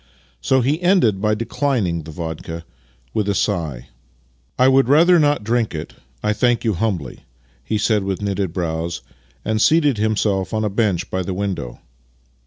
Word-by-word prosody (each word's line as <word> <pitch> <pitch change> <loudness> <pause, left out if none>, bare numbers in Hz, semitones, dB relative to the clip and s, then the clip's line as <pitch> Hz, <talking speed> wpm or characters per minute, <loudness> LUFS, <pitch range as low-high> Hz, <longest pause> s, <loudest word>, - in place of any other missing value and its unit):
So 130 - +2
he 145 +7 0
ended 175 - +3
by 105 0 +2
declining 115 - -1
the 80 - -11
vodka 80 +1 -6 0.5
with 105 -1 0
a 100 - +1
sigh. 80 - -2 0.3
" - - -38 0.3
I 130 - +5
would 135 -1 +4
rather 170 +5 +6
not 145 -6 +2
drink 115 -3 0
it, 75 - -6 0.3
I 105 - +2
thank 120 +1 +1
you 110 -3 +1
humbly," 90 - -2 0.4
he 105 +11 -1
said 105 -1 +1
with 95 -1 -2
knitted 100 -3 -2
brows, 85 0 -3 0.4
and 110 0 0
seated 150 -7 +3
himself 105 -2 0
on 110 0 0
a 105 - -1
bench 100 -4 0
by 95 - -1
the 90 0 -4
window. 95 -11 -4
105 Hz, 170 wpm, -20 LUFS, 90-120 Hz, 0.5 s, rather